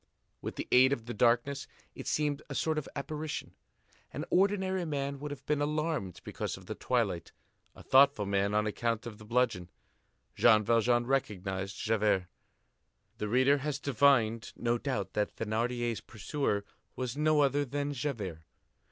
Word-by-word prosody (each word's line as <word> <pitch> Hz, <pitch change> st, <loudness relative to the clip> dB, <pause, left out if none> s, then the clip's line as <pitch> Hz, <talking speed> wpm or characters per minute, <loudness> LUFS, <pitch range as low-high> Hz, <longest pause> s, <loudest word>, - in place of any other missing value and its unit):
With -, -, -5 dB
the -, -, -5 dB
aid 130 Hz, +2 st, +6 dB
of 115 Hz, -5 st, -4 dB
the 120 Hz, -, -5 dB
darkness, 120 Hz, +5 st, +2 dB, 0.3 s
it -, -, -8 dB
seemed 150 Hz, -1 st, 0 dB
a 135 Hz, -, -5 dB
sort 155 Hz, +2 st, +1 dB
of 145 Hz, -, -8 dB
apparition. 150 Hz, +2 st, -4 dB, 0.6 s
An -, -, -4 dB
ordinary 190 Hz, -1 st, +2 dB
man 140 Hz, -3 st, -3 dB
would 150 Hz, +1 st, -5 dB
have 140 Hz, -2 st, -8 dB
been 150 Hz, -1 st, 0 dB
alarmed 150 Hz, -, -1 dB
because -, -, -4 dB
of -, -, -14 dB
the -, -, -4 dB
twilight, -, -, -1 dB, 0.4 s
a -, -, -13 dB
thoughtful 135 Hz, -5 st, +5 dB
man 100 Hz, +1 st, +1 dB
on 105 Hz, 0 st, +2 dB
account 115 Hz, +2 st, -1 dB
of 110 Hz, -3 st, -8 dB
the 110 Hz, -, -12 dB
bludgeon. 110 Hz, -6 st, 0 dB, 0.7 s
Jean 110 Hz, -2 st, +5 dB
Valjean 120 Hz, +2 st, +3 dB
recognized 95 Hz, -7 st, -2 dB
Javert. 105 Hz, -4 st, +1 dB, 0.9 s
The 105 Hz, -, -2 dB
reader 130 Hz, +5 st, +4 dB
has 145 Hz, 0 st, -2 dB
divined, 130 Hz, -5 st, +2 dB
no 120 Hz, 0 st, 0 dB
doubt, 130 Hz, 0 st, -3 dB
that 105 Hz, 0 st, -1 dB
Thénardier's 115 Hz, +1 st, -1 dB
pursuer 110 Hz, -2 st, -2 dB, 0.3 s
was 125 Hz, -1 st, -3 dB
no 150 Hz, 0 st, +3 dB
other 145 Hz, +1 st, +2 dB
than 145 Hz, +2 st, -2 dB
Javert. 115 Hz, -, -3 dB
125 Hz, 155 wpm, -31 LUFS, 110-145 Hz, 0.9 s, aid